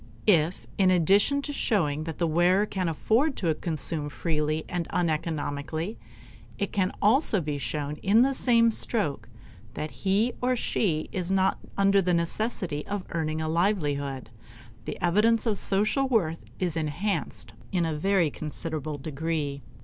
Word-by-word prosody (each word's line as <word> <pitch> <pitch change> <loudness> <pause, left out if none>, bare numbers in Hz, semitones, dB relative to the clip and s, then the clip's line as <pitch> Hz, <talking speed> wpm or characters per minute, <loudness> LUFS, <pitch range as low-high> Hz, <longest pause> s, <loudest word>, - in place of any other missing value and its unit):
If, 170 -3 +3
in 190 -1 +5
addition 195 - +3
to 290 - -4
showing 155 - 0
that 165 -2 -5
the 170 - +1
wearer 175 +5 +3
can 185 -4 -2
afford 240 - +1
to 165 -4 +1
consume 155 -2 -2
freely 155 0 -1
and 175 -2 -3
uneconomically, 160 +2 -2 0.6
it 200 - -2
can 190 -2 +1
also 220 0 +4
be 150 -3 -3
shown 145 +3 -3
in 210 +8 +4
the 275 +1 +2
same 230 -3 +4
stroke 145 - -1 0.5
that 155 - -4
he 205 +5 +1
or 250 0 +2
she 165 -9 0
is 185 -1 -3
not 190 0 +2 0.2
under 195 0 +4
the 180 -1 +1
necessity 170 -3 -2
of 200 -2 -3
earning 160 -1 -1
a - - -2
livelihood, 145 - -1 0.5
the - - -5
evidence 210 +6 +3
of 215 -4 0
social 215 +8 +1
worth 175 -10 0
is 175 -4 -1
enhanced 165 +6 -2 0.2
in 180 -3 +1
a 160 - -1
very 175 -1 +2
considerable 155 -1 -5
degree. 145 -1 -3
175 Hz, 150 wpm, -27 LUFS, 155-205 Hz, 0.6 s, in